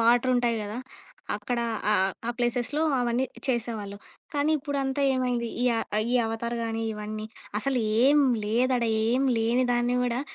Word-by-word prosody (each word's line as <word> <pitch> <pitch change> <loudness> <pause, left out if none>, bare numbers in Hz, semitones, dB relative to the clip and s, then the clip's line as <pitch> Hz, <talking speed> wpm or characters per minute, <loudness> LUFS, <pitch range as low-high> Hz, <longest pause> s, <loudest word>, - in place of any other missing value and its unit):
వాటరుంటాయి 240 0 +3
గదా! 210 +3 -5 0.6
అక్కడ 245 -2 -2 0.3
ఆ - - +5
ఆ - - +5 0.3
ఆ - - +2
ప్లేసెస్‌లో 245 +5 0 0.2
అవన్నీ 240 +1 +1 0.2
చేసేవాళ్ళు. 225 -5 -2 0.4
కానీ, 290 +1 +2
ఇప్పుడంతా 280 -1 -2
ఏమైంది? 245 -2 0
ఈ - - +2
అ - - +1 0.3
ఈ - - +2
'అవతార్' 230 +1 -3
గానీ, 225 0 -2
ఇవన్నీ 215 0 -5 0.3
అసలేం 250 +3 +3 0.2
లేదాడా, 240 +2 +1 0.2
ఏం 255 +4 +2
లేని 235 +3 +2
దాన్ని 240 +1 +1
గూడా 245 0 0
240 Hz, 140 wpm, -27 LUFS, 225-255 Hz, 0.6 s, ఆ